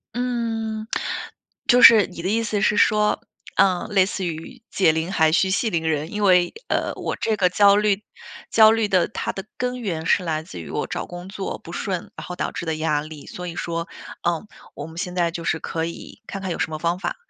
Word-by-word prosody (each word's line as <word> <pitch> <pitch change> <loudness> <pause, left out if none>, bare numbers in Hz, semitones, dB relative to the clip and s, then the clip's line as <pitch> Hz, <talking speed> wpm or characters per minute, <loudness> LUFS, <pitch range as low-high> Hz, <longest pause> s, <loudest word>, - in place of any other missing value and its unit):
嗯， 225 -3 -2 0.8
就 245 0 +5
是 220 -4 +9
你 175 -2 -9
的 185 - -2
意 225 +2 +1
思 210 -3 -1
是 210 - +2
说， 210 0 +3 0.4
嗯， 185 -1 +3
类 195 -3 +4
似 195 -1 -3
于 170 +9 -6
解 185 -5 +3
铃 160 +3 -2
还 160 -5 +3
需 190 +3 +3
系 220 +4 +1
铃 165 -1 0
人。 155 +1 -1
因 210 - -3
为， 180 -2 +4
呃， - - 0
我 - - -3
这 220 -1 0
个 185 -3 +3
焦 200 +1 +5
虑 210 0 +2 0.5
焦 220 -1 +7
虑 225 -2 +1
的 185 -3 +3
它 - - -4
的 195 - -6
根 250 0 -2
源 165 -7 -3
是 180 - +3
来 160 -2 -2
自 90 - -9
于 - - -9
我 - - -2
找 - - -4
工 175 +1 -8
作 195 -1 -4
不 170 - -12
顺， 185 -2 -4
然 - - -8
后 180 - -5
导 - - -2
致 - - -5
的 160 - 0
压 155 -1 0
力。 150 -1 -10
所 180 0 -7
以 170 - -6
说， 170 0 -3 0.4
嗯， 175 +4 -1 0.3
我 - - -6
们 165 +1 -12
现 180 -2 -4
在 170 -2 +1
就 170 0 -6
是 165 - 0
可 160 - -3
以 170 - -9
看 195 - -6
看 190 - -2
有 - - -4
什 - - 0
么 155 - -3
方 170 +3 0
法， - - -3
185 Hz, 245 characters per minute, -23 LUFS, 165-210 Hz, 0.8 s, 是